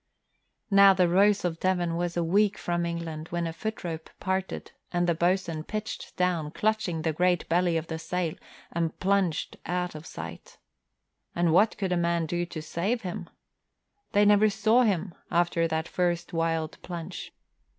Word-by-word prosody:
Now 195 -1 +8
the 180 -1 +4
Rose 195 +3 +4
of 165 -2 -2
Devon 175 -3 +1
was 175 0 -2
a 170 - +2
week 200 +4 +3
from 175 0 -1
England 165 -2 -4
when 170 0 -2
a 165 - -3
footrope 165 -4 -5
parted 190 0 -2 0.2
and 175 0 +1
the 170 - +3
boatswain 170 -1 0
pitched 215 +5 -5
down, 175 -4 +1
clutching 215 -2 0
at 160 - -4
the 160 -1 +1
great 175 +1 +1
belly 175 0 +2
of 160 - -3
the 160 -1 -5
sail, 175 -1 -2 0.4
and 165 -1 -2
plunged 190 -4 +1
out 180 0 -1
of 155 +1 -9
sight. 85 +1 -9 0.8
And 170 -2 +2
what 210 +5 +4
could 190 -2 -2
a 180 - +2
man 170 -1 +1
do 175 +2 -2
to 155 -2 -6
save 200 +9 -1
him? 180 -2 -5 0.8
They 205 +1 +5
never 210 +1 +6
saw 220 +4 +3
him 190 -6 +1 0.2
after 170 -1 +2
that 160 0 -2
first 175 -1 -1
wild 165 -1 -1
plunge. 175 0 -6
175 Hz, 170 wpm, -28 LUFS, 165-190 Hz, 0.8 s, Now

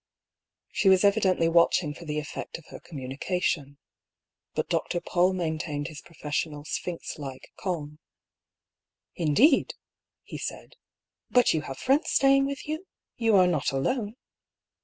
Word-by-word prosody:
She 195 - +3
was 190 0 +5
evidently 200 -4 +3
watching 165 -2 +3
for 170 - -11
the 150 -1 -3
effect 150 -1 -5
of 165 - -16
her - - -9
communication. 145 +1 -3 0.8
But - - -1
Dr. 175 - -1
Paull 180 +1 +2
maintained 160 -4 -2
his 155 -2 -9
profes 150 -3 -3
sional 150 -2 -9
sphinx 170 0 -4
like 135 -3 -8
calm. 150 -5 -4 0.6
" 105 +2 -62
Indeed! 265 - +4 0.3
" - - -64
he - - -8
said. - - -6 0.3
" - - -65
But 245 -1 +4
you 160 - 0
have 135 -3 -7
friends 275 +5 +2
staying 275 0 +4
with 280 0 -5
you? 315 +5 -4 0.3
You 225 -3 +3
are 185 -2 +7
not 165 -8 +1
alone 205 - -1
170 Hz, 150 wpm, -27 LUFS, 150-200 Hz, 0.8 s, are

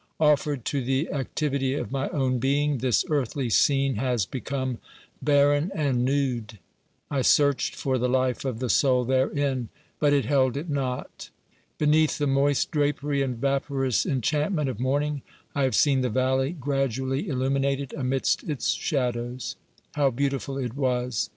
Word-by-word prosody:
Offered 150 -4 +2
to 140 -3 -1
the 135 +5 0
activity 135 -1 -1
of - - -4
my 135 0 -1
own 130 -3 0
being, 140 +2 +1
this 125 -3 +2
earthly 135 -4 -1
scene 135 0 +3
has 125 -4 0
become 130 +1 -4 0.4
barren 145 +3 +3
and 135 -6 +1
nude; 125 -5 -1 0.5
I 140 -2 +1
searched 145 +1 +3
for 130 -2 -1
the 125 +1 +1
life 130 -1 +1
of 130 -4 -2
the 125 +2 -2
soul 125 0 +3
therein, 130 -1 0 0.3
but 145 -1 +3
it 140 -4 +2
held 130 0 +2
it 155 +2 -4
not. 130 -3 -4 0.5
Beneath 155 +1 +3
the 145 - 0
moist 140 0 +2
drapery 145 -2 0
and 130 -3 -2
vaporous 135 -1 0
enchantment 150 - 0
of 125 - -5
morning, 145 +3 0 0.3
I 140 -1 +1
have 130 - 0
seen 140 -3 +3
the 125 - 0
valley 130 +5 +1
gradually 135 -2 -1
illuminated 135 0 -1
amidst 135 -2 0
its 145 -6 -2
shadows. 125 -3 -2 0.4
How 145 -2 +3
beautiful 135 +1 -2
it 125 -3 -4
was! 125 -4 -1
135 Hz, 150 wpm, -26 LUFS, 130-145 Hz, 0.5 s, scene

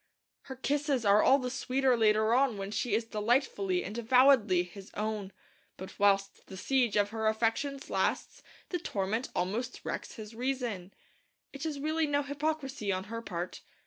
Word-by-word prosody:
Her 265 - -5
kisses 275 -2 0
are 205 +1 +6
all 270 - +6
the 250 -2 -3
sweeter 260 0 +1
later 220 0 +3
on 255 -3 +3
when 195 0 -5
she 215 0 0
is 225 +1 0
delightfully 210 -4 0
and 205 - -6
avowedly 235 -6 +5
his 190 +2 -12
own; 210 -2 -3 0.5
but 190 - -10
whilst 195 -1 +2
the 190 - -9
siege 250 +1 +1
of 205 0 +2
her 220 -1 -1
affections 230 +6 0
lasts - - -1 0.3
the 355 - -2
torment 215 - -2
almost 205 +8 -2
wrecks - - -5
his 220 -2 -9
reason. 240 -7 -3 0.6
It 280 +3 -4
is 295 -3 -4
really 310 +2 0
no 285 0 +1
hypocrisy 285 -6 -2
on 185 0 -2
her 230 - -3
part. 180 -5 -5
230 Hz, 165 wpm, -30 LUFS, 205-270 Hz, 0.6 s, are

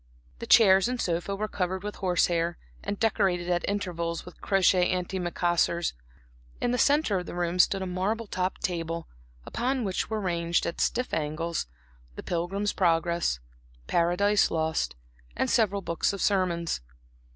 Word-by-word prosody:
The - - -6
chairs 195 -3 +6
and 250 0 -2
sofa 175 +1 -1
were 215 +2 -2
covered 185 -1 -2
with 210 0 -5
horse 180 -3 +2
hair, 170 0 -1 0.3
and 205 - -3
decorated, 195 -6 +1
at 175 0 +1
intervals, 170 -4 -3
with 180 - -13
crochet 185 -2 +3
anti 185 +1 -2
macassars. 175 -1 0 0.7
In 240 - 0
the 250 - 0
centre 285 -9 +3
of 180 - -7
the - - -6
room 175 0 -1
stood 190 +1 +4
a - - -3
marble 190 +5 -1
topped 185 -2 -3
table, 165 -2 -2 0.4
upon 255 +1 -1
which 190 -3 -2
were 220 -1 -1
ranged, 170 -3 0
at 170 - -3
stiff 250 - 0
angles, 160 - -2 0.5
the - - -7
Pilgrim's 190 +4 -1
Progress, 170 - +1 0.5
Paradise 180 - +2
Lost, 160 - -1 0.4
and - - +1
several 200 -3 +2
books 170 +3 0
of 200 - -5
sermons. 180 - 0
180 Hz, 155 wpm, -27 LUFS, 170-200 Hz, 0.7 s, chairs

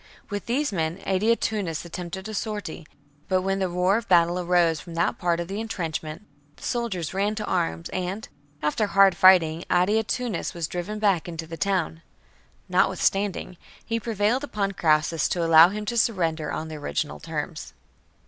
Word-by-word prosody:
With 205 -1 -4
these 275 +4 0
men 165 0 -1
Adia 210 +5 +2
tunnus 195 -9 -2
attempted 180 +3 -6
a 220 - -6
sortie; 205 -6 -4 0.4
but 185 -1 +1
when 195 0 0
the 190 -1 0
roar 180 +3 +2
of 230 0 -5
battle 175 0 +4
arose 175 -3 +2
from 170 +1 -10
that 170 - 0
part 175 -1 +1
of 170 - -3
the 200 +3 -4
entrench 175 -8 -3
ment, 155 +5 -8 0.3
the - - -16
soldiers 220 -10 -2
ran 200 +3 0
to 210 -1 -3
arms, 80 0 -1
and, 185 +3 -4 0.4
after 180 +8 +1
hard 195 -1 +5
fighting, 175 -4 +5
Adiatunnus 215 +4 0
was 170 -2 -2
driven 180 +5 -4
back 195 -5 +1
into 165 -1 -5
the 165 +1 -7
town. 175 -3 -1 0.7
Notwithstanding, 195 -2 +1 0.3
he 230 0 -1
prevailed 225 +3 0
upon 205 -8 -2
Crassus 155 -2 +2
to 170 -2 0
allow 165 +1 +8
him 210 +2 -5
to 235 +2 -2
surrender 165 -9 0
on 160 - -4
the 155 -1 -7
original 145 +1 -3
terms. 160 0 -5
185 Hz, 170 wpm, -25 LUFS, 165-205 Hz, 0.7 s, allow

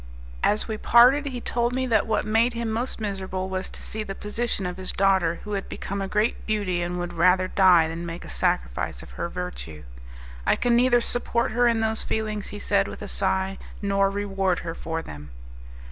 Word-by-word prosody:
As 210 - +1
we 220 -1 -3
parted, 255 +5 +6
he 255 -3 -4
told 240 0 -1
me 260 0 0
that 225 -4 +2
what 220 - 0
made 225 +3 +2
him 230 -1 -2
most 235 +3 -2
miserable 190 -3 -3
was 185 0 -3
to - - -8
see 220 - -3
the 195 -2 -5
position 210 -1 -2
of 180 0 -4
his 185 0 -2
daughter, 190 -4 +2
who 210 - -5
had 195 -1 -3
become 200 0 -4
a 195 - -2
great 210 +3 0
beauty, 200 -5 0
and 175 +1 -2
would 175 0 -4
rather 185 0 +3
die 180 -4 +5
than 165 +1 -5
make 170 0 -6
a - - -10
sacrifice - - -1
of - - -13
her 170 - -4
virtue. 175 - -6 0.6
"I - - +3
can 240 -1 +2
neither 240 0 +4
support 235 -1 0
her 245 +2 +3
in 230 -1 +2
those 220 0 0
feelings," 215 -2 -2
he 210 - -7
said, 200 -1 +1
with - - -8
a - - -5
sigh, 190 -1 -1 0.2
"nor 195 -1 +2
reward 195 -2 0
her 165 - -3
for 165 -1 -4
them." 75 -1 -9
200 Hz, 205 wpm, -25 LUFS, 180-225 Hz, 0.6 s, parted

